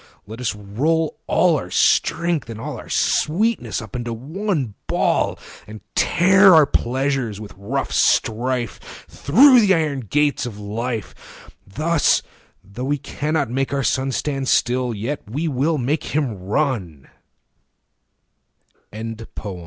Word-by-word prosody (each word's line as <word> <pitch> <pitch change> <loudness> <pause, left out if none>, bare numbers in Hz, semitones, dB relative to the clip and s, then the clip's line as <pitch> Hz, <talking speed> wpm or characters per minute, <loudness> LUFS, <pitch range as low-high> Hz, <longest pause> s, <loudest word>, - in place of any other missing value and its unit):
40 - - -27
Let 115 +3 -8
us 115 -4 -1
roll 145 +11 -1
all - - +3
our - - -8
strength 170 -6 +1
and 110 -1 -7
all - - -5
Our - - -12
sweetness 205 - 0
up 110 - -10
into 120 -1 -3
one 150 - -3
ball, - - +1 0.3
And 110 +1 -9
tear 190 +2 +5
our 155 -2 +7
pleasures 130 -4 -1
with 105 -3 -9
rough 125 +8 -3
strife 120 0 +1 0.3
Thorough 255 - +5
the 200 -4 +4
iron 150 -4 -1
gates 140 +3 0
of 110 -4 -8
life: 110 +2 -6 0.2
Thus, 155 +9 +1 0.4
though 100 +6 -7
we 145 +2 0
cannot 145 -1 -2
make 135 +1 -1
our 135 - -1
sun 130 0 +1
45 135 - -2
Stand 135 -3 -2
still, 125 -1 +1
yet 120 +8 -4
we 150 +9 -2
135 Hz, 120 wpm, -21 LUFS, 115-155 Hz, 0.4 s, our